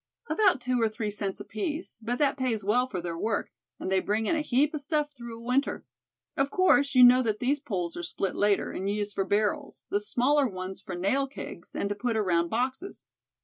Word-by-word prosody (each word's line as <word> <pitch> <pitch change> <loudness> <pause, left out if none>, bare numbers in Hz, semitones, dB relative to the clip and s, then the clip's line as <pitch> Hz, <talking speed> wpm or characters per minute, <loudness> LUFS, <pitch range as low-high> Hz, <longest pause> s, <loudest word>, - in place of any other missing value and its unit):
"About 385 -9 +3
two 250 -1 0
or 225 - +3
three 215 -1 -3
cents 200 -2 -3
apiece, 290 - -5
but 240 +2 -1
that 285 -1 +2
pays 250 -6 -1
well 245 +6 +2
for 185 -8 -4
their 170 -1 -4
work, 205 - -2 0.3
and 185 - -4
they 190 - +4
bring 210 +4 -1
in 330 - +1
a 310 - 0
heap 290 +1 +2
of 305 - -3
stuff 295 0 -1
through 235 -3 -8
a 230 - -12
winter. 255 +4 0 0.5
Of 275 0 +1
course, 285 -6 +3
you 250 - +8
know 250 +1 +8
that 220 -4 0
these 275 +5 0
poles 185 - -3
are - - -4
split 190 +2 -2
later, 205 0 +2
and 195 +1 -3
used 205 0 -2
for 195 - -1
barrels, 205 +1 -1
the 205 - +2
smaller 255 +7 +2
ones 185 -2 -6
for 185 - -6
nail 230 +10 +1
kegs, 275 - -9
and - - -1
to - - 0
put 230 +2 -1
around 170 -5 +1
boxes. 260 - -3
230 Hz, 220 wpm, -28 LUFS, 205-275 Hz, 0.5 s, you